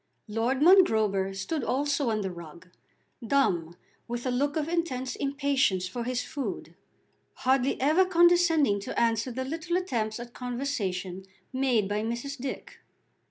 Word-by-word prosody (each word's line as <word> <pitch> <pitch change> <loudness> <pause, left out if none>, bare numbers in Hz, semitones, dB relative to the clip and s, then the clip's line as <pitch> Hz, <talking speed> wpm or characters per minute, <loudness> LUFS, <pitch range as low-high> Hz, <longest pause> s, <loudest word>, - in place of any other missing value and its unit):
Lord 235 +6 0
Mongrober 220 - +4
stood 285 +9 -3
also 280 0 0
on 215 -1 0
the 190 -2 -3
rug, 170 +1 -11 0.5
dumb, 180 -10 +1 0.3
with 240 +1 -4
a 255 - 0
look 280 +4 0
of 305 -1 -1
intense 265 -7 -2
impatience 275 -9 0
for 235 +5 -5
his 250 0 -1
food, 280 -3 -5 0.6
hardly 265 +1 +1
ever 310 +7 +4
condescending 345 - +4
to 200 - -4
answer 230 +1 +1
the 260 +2 -4
little 330 +5 -2
attempts 235 -12 -2
at 240 0 -9
conversation 200 -8 -3 0.3
made 255 -6 +1
by 205 +1 -1
Mrs. 240 +5 -4
Dick. 265 +1 -6
250 Hz, 140 wpm, -28 LUFS, 215-285 Hz, 0.6 s, Mongrober